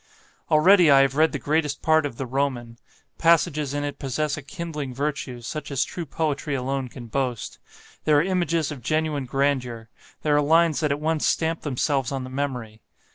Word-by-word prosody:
"Already 175 +2 +6
I 135 -1 +7
have 135 0 +2
read 160 +2 +4
the - - -2
greatest 150 +2 -1
part 160 -1 +3
of 120 - -11
the 135 - -3
'Roman;' 125 -3 -2 0.4
passages 155 -4 +2
in 145 - -1
it 145 -1 -4
possess 140 +2 -1
a 145 - -7
kindling 145 -2 -6
virtue 140 -3 -3
such 150 +6 -6
as 140 -1 +1
true 170 -3 -6
poetry 150 0 -2
alone 135 0 -2
can 120 0 -10
boast; 125 -1 -3 0.5
there 150 -1 +4
are 145 - +4
images 170 -4 0
of 140 -4 -7
genuine 155 +1 -1
grandeur; 125 -4 -1 0.3
there 150 -1 +2
are 145 - +4
lines 160 +1 +3
that 150 -3 0
at 140 - -1
once 155 0 0
stamp 165 0 0
themselves 135 -2 -1
on 135 -1 -3
the 130 - -8
memory. 125 -6 -4
145 Hz, 185 wpm, -24 LUFS, 130-155 Hz, 0.5 s, I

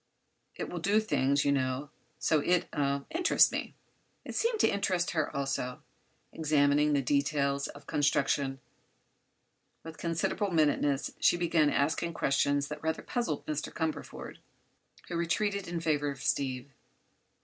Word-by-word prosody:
It - - -4
will 175 - -5
do 200 +6 +3
things, 140 -8 +1
you 140 - +3
know. 135 +1 -1 0.3
So 155 - +2
it—er—interests 145 - +2
me." - - -4 0.5
It - - -6
seemed 460 -1 0
to - - +5
interest 185 -3 0
her, 155 -3 0
also. 135 -2 -3 0.5
Examining 150 -1 +3
the 140 -1 +2
details 140 0 +1
of 145 0 -12
construction 140 -2 +1 1.2
with 160 0 -10
considerable 170 +4 -1
minuteness 145 -4 +1
she - - +4
began 165 -3 +3
asking 160 +4 0
questions 140 +1 +1
that 150 - -6
rather 160 0 -2
puzzled 235 - -2
Mr. 155 -1 -3
Cumberford, 160 -2 -4 0.7
who 175 - -5
retreated 200 +4 0
in 170 0 -3
favor 150 -3 0
of 140 -1 -7
Steve. 130 -1 -1
150 Hz, 130 wpm, -30 LUFS, 140-170 Hz, 1.2 s, to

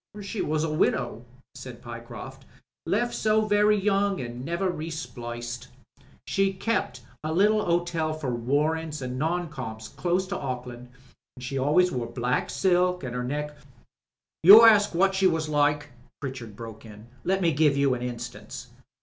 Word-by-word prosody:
^ 205 - -7
"She 200 +1 -4
was 155 0 0
a 160 -1 -1
widow," 155 - 0 0.3
said - - -9
Pyecroft. - - -9 0.4
"Left 240 0 0
so 215 0 +2
very 210 0 +3
young 200 0 +1
and 120 0 -6
never 170 +5 -1
re 160 -1 -5
spliced. 120 -5 -6 0.6
She 195 0 +1
kep' 195 - -1 0.3
a 155 - -2
little 210 +5 +3
hotel 170 -2 0
for 155 -5 -3
warrants 150 +6 -1
and 125 0 -4
non 170 +3 0
coms 110 -6 -7
close 180 +2 -1
to 195 - -2
Auckland, 125 -2 -6 0.5
an' - - -11
she 135 +2 -3
always 160 +7 +3
wore 120 -5 -3
black 125 +1 -1
silk, 180 -2 +1
and 125 -1 -5
'er 125 - -2
neck 150 +3 -3 0.5
" - - -66
"You 205 +6 +11
ask 205 -4 +5
what 195 +2 +3
she 190 0 +3
was 160 -3 0
like," 150 -1 +1 0.3
Pritchard 130 -6 -7
broke 115 0 -9
in. 105 -1 -12 0.2
"Let 190 +1 +1
me 170 -4 +2
give 145 -1 +3
you 140 -2 +3
an 125 - -4
instance. 125 0 -7
155 Hz, 165 wpm, -26 LUFS, 125-185 Hz, 0.6 s, You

